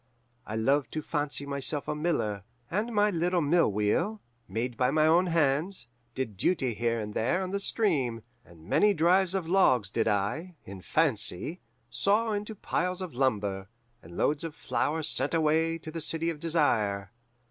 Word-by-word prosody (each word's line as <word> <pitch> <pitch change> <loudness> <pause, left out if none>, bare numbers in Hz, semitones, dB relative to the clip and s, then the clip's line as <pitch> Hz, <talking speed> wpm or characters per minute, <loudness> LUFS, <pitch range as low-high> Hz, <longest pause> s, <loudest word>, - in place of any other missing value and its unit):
I 110 - -4
loved 135 +5 +1
to 155 - -3
fancy 145 -2 -2
myself 140 +1 -1
a - - -1
miller, 130 - -1 0.3
and 210 +6 -1
my 210 -1 +3
little 175 0 +1
mill 165 -4 +3
wheel, 105 - 0 0.3
made 120 +2 -3
by 125 +1 +2
my 155 +2 +3
own 170 +3 +4
hands, 160 -2 +1 0.3
did 120 -7 -4
duty 130 - +1
here 115 +1 -1
and 105 -1 -5
there 155 - 0
on 185 - -4
the 200 - -1
stream, 140 - +1 0.2
and 85 -6 -17
many 205 - +3
drives 180 +3 +3
of 185 -4 -2
logs 130 - +3
did 115 - 0
I, 110 - -1
in 95 -1 -9
fancy, 145 - 0 0.3
saw 205 - +2
into 210 +1 -4
piles 180 -1 -2
of 180 - -7
lumber, 105 -6 -1 0.3
and 85 +1 -12
loads 145 +1 +1
of 165 -2 -6
flour 160 +2 -1
sent 145 0 +1
away 160 +1 +2
to 160 -1 -9
the 165 0 -5
City 165 +2 0
of 155 - -8
Desire. 110 -12 0
150 Hz, 170 wpm, -28 LUFS, 115-175 Hz, 0.3 s, own